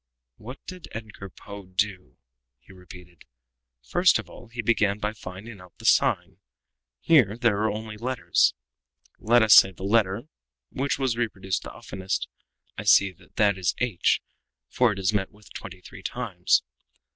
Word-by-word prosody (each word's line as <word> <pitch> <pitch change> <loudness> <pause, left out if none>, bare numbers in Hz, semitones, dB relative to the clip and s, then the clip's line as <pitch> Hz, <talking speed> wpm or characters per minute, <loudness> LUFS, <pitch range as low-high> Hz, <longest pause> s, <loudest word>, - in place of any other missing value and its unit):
"What 125 +5 -11
did 185 -2 -9
Edgar 105 -3 -8
Poe 100 +1 -11
do?" 90 - -2 0.4
he 80 - -18
repeated. 90 -2 -15 0.6
"First 175 - +3
of - - -8
all - - -13
he 120 +1 -6
began 105 -3 +2
by 105 0 -3
finding 100 +1 -10
out 90 - -17
the - - -12
sign - - +2 0.6
here 120 -10 +4
there 115 -4 +2
are 110 +1 +1
only 110 0 -6
letters, 120 - +1 0.6
let 120 +1 +4
us 110 -1 +6
say 95 - +8
the 95 - -11
letter 100 0 +1 0.5
which 135 +1 -1
was 130 -4 -1
reproduced 95 -6 -2
the - - -9
oftenest. 95 +1 -4 0.5
I - - -4
see 100 -1 +5
that 90 - -23
that 100 -3 +2
is 90 - 0
h, 120 -8 +1 0.5
for 125 -3 +3
it 100 - -5
is 95 +1 0
met 95 -2 0
with 105 0 -18
twenty 90 - -9
three - - -12
times. - - 0
105 Hz, 160 wpm, -25 LUFS, 95-115 Hz, 0.6 s, say